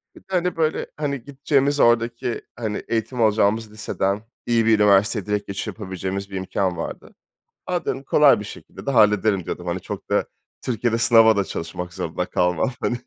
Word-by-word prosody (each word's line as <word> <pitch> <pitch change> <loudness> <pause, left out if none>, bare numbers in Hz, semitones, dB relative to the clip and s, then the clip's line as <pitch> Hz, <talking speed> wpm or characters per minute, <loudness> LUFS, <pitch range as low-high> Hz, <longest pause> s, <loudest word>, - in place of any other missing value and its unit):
Bir - - -13
de - - -34
hani 180 -1 0
böyle, 160 -1 0
hani, 140 -5 -3
gideceğimiz 140 +1 0
oradaki, 120 0 +2
hani, 110 -3 -4
eğitim 115 +2 -2
alacağımız 110 0 +2
liseden 100 -1 -2 0.2
iyi 115 -1 +2
bir 110 -1 +4
üniversiteye 100 0 +3
direkt 105 -1 -2
geçiş 100 -1 -4
yapabileceğimiz 95 -1 -5
bir 95 - -8
imkân 95 -1 -1
vardı. 80 - -7 0.5
A 180 -1 -1
dedim, 135 - -2
kolay 140 -6 +5
bir - - -6
şekilde 105 - -11
de - - +1
hallederim 105 -5 +3
diyordum. 90 +1 -5
Hani 85 +1 -2
çok - - -8
da - - +2 0.4
Türkiye'de 115 -1 0
sınava 115 -2 +6
da 100 - +2
çalışmak 90 +1 -6
zorunda 90 -1 -3
kalmam 90 +5 +1
hani 120 - 0
110 Hz, 175 wpm, -22 LUFS, 100-120 Hz, 0.5 s, sınava